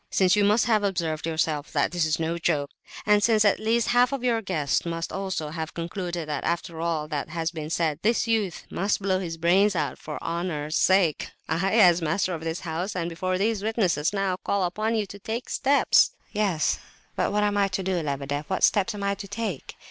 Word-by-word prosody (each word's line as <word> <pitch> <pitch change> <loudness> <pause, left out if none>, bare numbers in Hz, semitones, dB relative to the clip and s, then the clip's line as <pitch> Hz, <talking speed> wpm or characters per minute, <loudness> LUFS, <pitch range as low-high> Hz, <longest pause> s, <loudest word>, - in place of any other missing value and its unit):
"Since 185 -1 +3
you 210 - +3
must 210 +3 +3
have 220 -3 +2
observed 165 -5 -1
yourself 155 -2 -1
that 145 -2 +1
this 175 -2 +1
is 155 - 0
no 165 +1 -1
joke, 150 -4 0 0.3
and 210 0 +4
since 220 -1 +3
at 205 - +3
least 225 +2 +1
half 245 +1 +4
your 240 -2 +1
guests 155 -9 0
must 165 0 -4
also 190 -6 -3
have 160 0 -5
concluded 170 -1 -4
that 150 -2 -3
after 170 -1 -2
all 165 -3 -1
that 150 -1 -3
has 165 0 -2
been 155 -3 -6
said 160 -2 0
this 230 +2 +2
youth 215 -6 -1
must 200 +3 0
blow 190 -1 0
his 165 -3 -5
brains 190 +5 +3
out 150 -4 -2
for 150 - -6
honour's 165 -3 -3
sake—I—as 180 +1 +3
master 180 +4 0
of 160 -1 -5
this 165 +1 -3
house, 175 +3 -3
and 170 -2 -2
before 185 +2 -2
these 210 +1 0
witnesses, 195 -8 +1
now 195 -2 -1
call 200 -1 0
upon 215 +6 -1
you 215 -2 0
to 200 +1 -11
take 225 +5 -5
steps." 280 +1 +3 0.2
"Yes, 200 -7 0 0.4
but - - 0
what 210 0 +1
am 205 0 +1
I 200 -1 +3
to 190 0 -3
do, 185 -2 0
Lebedeff? 145 0 -3
What 190 - -1
steps 210 +2 +3
am 200 - -5
I 200 0 +1
to 200 0 -8
take? 205 - -5
180 Hz, 205 wpm, -25 LUFS, 160-205 Hz, 0.4 s, and